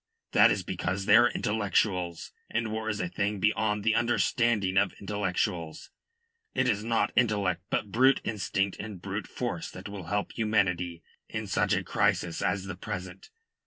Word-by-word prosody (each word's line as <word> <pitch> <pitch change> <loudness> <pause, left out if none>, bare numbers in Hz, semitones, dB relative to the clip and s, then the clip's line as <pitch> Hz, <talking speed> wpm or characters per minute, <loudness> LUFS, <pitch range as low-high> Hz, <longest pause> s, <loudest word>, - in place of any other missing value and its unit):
That - - +7
is - - 0
because 95 +2 -2
they 100 - +6
are 120 +1 +7
intellectuals, 95 -6 0 0.2
and 115 -1 -1
war 110 0 -2
is 105 -1 -2
a 90 - -1
thing 100 +3 -2
beyond 105 0 +1
the 110 +1 +3
understanding 120 -4 +1
of 95 0 +3
intellectuals. 95 -4 -3 0.6
It 130 - +2
is 105 -3 +1
not 115 0 +1
intellect 100 -7 +2
but 100 - -1
brute 130 +5 +5
instinct 100 -2 -1
and 105 -3 -6
brute 100 +3 -4
force 115 -10 -4
that 90 +2 -9
will 100 -3 -7
help 105 +5 -2
humanity 90 -6 0 0.3
in - - -4
such - - +1
a - - +1
crisis 85 -1 0
as 95 -1 0
the 95 -1 -5
present. 95 - -7
100 Hz, 165 wpm, -28 LUFS, 95-110 Hz, 0.6 s, That